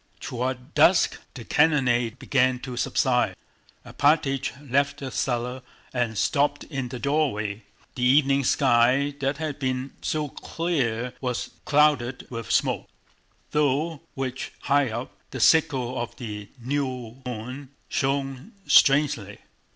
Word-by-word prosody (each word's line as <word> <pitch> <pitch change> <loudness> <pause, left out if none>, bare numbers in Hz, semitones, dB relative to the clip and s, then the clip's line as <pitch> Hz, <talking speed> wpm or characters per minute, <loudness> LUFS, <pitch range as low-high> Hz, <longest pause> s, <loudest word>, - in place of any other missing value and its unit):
Toward 125 +1 -4
dusk 165 +4 +4 0.2
the 120 -4 -8
cannonade 130 -6 +2
began 130 -1 +2
to 130 -2 -6
subside. - - +1 0.5
Alpátych 140 -2 +2 0.2
left 140 +2 +2
the 135 -3 -6
cellar 125 0 -2 0.3
and 120 -4 -1
stopped 145 +3 +1
in 135 -5 -4
the 125 - -5
doorway. 120 -7 0 0.3
The 125 - -6
evening 135 +2 +4
sky 125 +4 +3
that 135 +1 -1
had 155 -2 -4
been 130 0 -2
so 155 -1 -1
clear 125 -9 -2
was 125 -2 -3
clouded 145 -4 +2
with 115 -2 -6
smoke, - - +1 0.6
through 150 +2 +1 0.2
which, 130 -1 -4
high 140 -2 +2
up, 115 +3 -5 0.2
the 130 - -6
sickle 130 -1 +3
of 120 0 -6
the 105 -4 -7
new 130 -2 -3
moon 125 +4 -6 0.2
shone 135 - -2
strangely. 135 -8 +4
130 Hz, 120 wpm, -25 LUFS, 125-145 Hz, 0.6 s, dusk